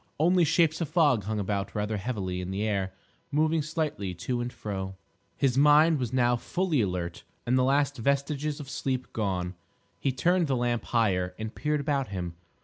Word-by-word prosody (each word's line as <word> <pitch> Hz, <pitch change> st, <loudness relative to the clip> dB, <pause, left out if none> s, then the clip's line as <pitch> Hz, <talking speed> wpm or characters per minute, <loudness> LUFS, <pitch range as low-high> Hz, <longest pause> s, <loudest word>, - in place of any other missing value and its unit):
Only 175 Hz, +3 st, +4 dB
shapes 160 Hz, +1 st, +2 dB
of 160 Hz, -, -1 dB
fog 145 Hz, -, +3 dB
hung 110 Hz, +1 st, -2 dB
about 100 Hz, 0 st, -2 dB
rather 105 Hz, +1 st, -1 dB
heavily 95 Hz, -4 st, -3 dB
in 90 Hz, -, -5 dB
the 95 Hz, +2 st, -2 dB
air, 100 Hz, -3 st, 0 dB, 0.4 s
moving 155 Hz, +2 st, +2 dB
slightly 150 Hz, -, -2 dB
to 120 Hz, +8 st, -2 dB
and 120 Hz, 0 st, -3 dB
fro. 95 Hz, -4 st, -5 dB, 0.4 s
His 135 Hz, -1 st, +2 dB
mind 150 Hz, +2 st, +6 dB
was 125 Hz, -3 st, -2 dB
now 120 Hz, -1 st, +3 dB
fully 175 Hz, +1 st, 0 dB
alert, 90 Hz, -4 st, -3 dB, 0.2 s
and 125 Hz, -, +2 dB
the 130 Hz, -, +4 dB
last 140 Hz, +1 st, +2 dB
vestiges 140 Hz, +4 st, 0 dB
of 145 Hz, -, -7 dB
sleep 130 Hz, -2 st, -3 dB
gone. 95 Hz, -4 st, -1 dB, 0.5 s
He 135 Hz, -, +1 dB
turned 175 Hz, +6 st, +2 dB
the 135 Hz, -, +1 dB
lamp 120 Hz, -2 st, 0 dB
higher 90 Hz, -6 st, +1 dB
and 110 Hz, 0 st, -5 dB
peered 150 Hz, -1 st, -1 dB
about 140 Hz, -2 st, 0 dB
him. 90 Hz, -3 st, -4 dB
125 Hz, 180 wpm, -28 LUFS, 100-150 Hz, 0.5 s, mind